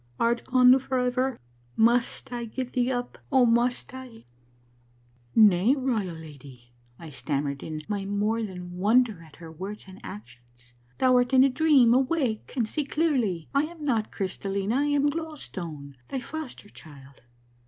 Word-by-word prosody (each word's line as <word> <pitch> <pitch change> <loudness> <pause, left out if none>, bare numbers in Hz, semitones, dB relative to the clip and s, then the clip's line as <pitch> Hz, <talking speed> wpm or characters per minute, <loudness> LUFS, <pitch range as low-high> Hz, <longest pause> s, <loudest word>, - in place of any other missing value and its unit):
Art 235 0 +1
gone 255 0 +6
forever? 255 0 -1 0.4
Must 235 +2 +1
I 240 -1 -3
give 250 +2 -5
thee 250 0 +1
up, 245 -1 -4
oh, 260 -3 +5
must 240 +2 +1
I?' 255 -3 -11 0.4
" 120 0 -36
' 120 0 -35
Nay, 210 +3 +5
Royal 225 - -1
Lady,' 140 -6 -13 0.2
I 165 -2 -10
stammered 140 0 -3
in 155 -1 -6
my 205 -2 -3
more 205 +3 0
than 180 -4 -7
wonder 215 -1 +2
at 160 -3 -16
her 165 -1 -11
words 195 +6 -7
and 190 0 -13
actions. 120 +2 -12
' 125 - -35
Thou 255 -1 +4
art 245 +1 +1
in 260 - +7
a 275 - +5
dream. 270 -4 +4
Awake, 260 -3 0
and 230 -3 +1
see 300 +7 -2
clearly; 260 - 0
I 280 +2 +3
am 320 -1 -9
not 225 -6 0
Crystallina. 195 +3 -2
I 285 - +2
am 290 0 +2
Glow 320 0 -5
Stone, 150 - -8
thy 265 - -3
foster 275 -6 -8
child. 140 -6 -15
220 Hz, 165 wpm, -26 LUFS, 160-255 Hz, 0.4 s, in